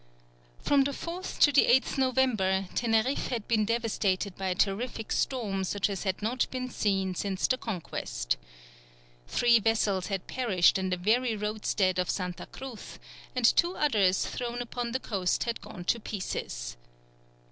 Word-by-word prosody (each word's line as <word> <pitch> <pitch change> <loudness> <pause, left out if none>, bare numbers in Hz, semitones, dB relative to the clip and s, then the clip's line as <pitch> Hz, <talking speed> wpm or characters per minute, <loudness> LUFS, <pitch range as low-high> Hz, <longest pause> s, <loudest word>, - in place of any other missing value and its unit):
From 280 -1 +4
the 280 - -1
4th 345 +6 -5
to 290 - +7
the 285 - +5
8th 260 +2 +3
November, 225 -8 +2
Teneriffe 235 +3 +1
had 235 -4 -3
been 215 -2 +2
devastated 210 -4 0
by 190 - -3
a 180 - 0
terrific 220 +4 -1
storm 210 -7 0
such 205 +2 0
as 195 +1 -4
had 190 +1 -2
not 240 +4 0
been 255 -1 -4
seen 195 -4 0
since 190 +1 -1
the 255 - +2
Conquest. - - -3 0.9
Three 235 - +4
vessels 205 -4 +1
had 195 -3 -3
perished 195 -7 +3
in 190 0 -1
the 180 - 0
very 225 +5 +2
roadstead 210 -3 0
of 180 - 0
Santa 180 -2 -3
Cruz, 265 -5 -9 0.4
and 250 -2 +1
two 345 +9 +4
others 205 -10 +2
thrown 240 0 -4
upon 240 0 -4
the 260 - -1
coast 190 -8 0
had 235 -1 -3
gone 175 - -9
to 235 - +1
pieces. - - -5
215 Hz, 160 wpm, -29 LUFS, 190-245 Hz, 0.9 s, to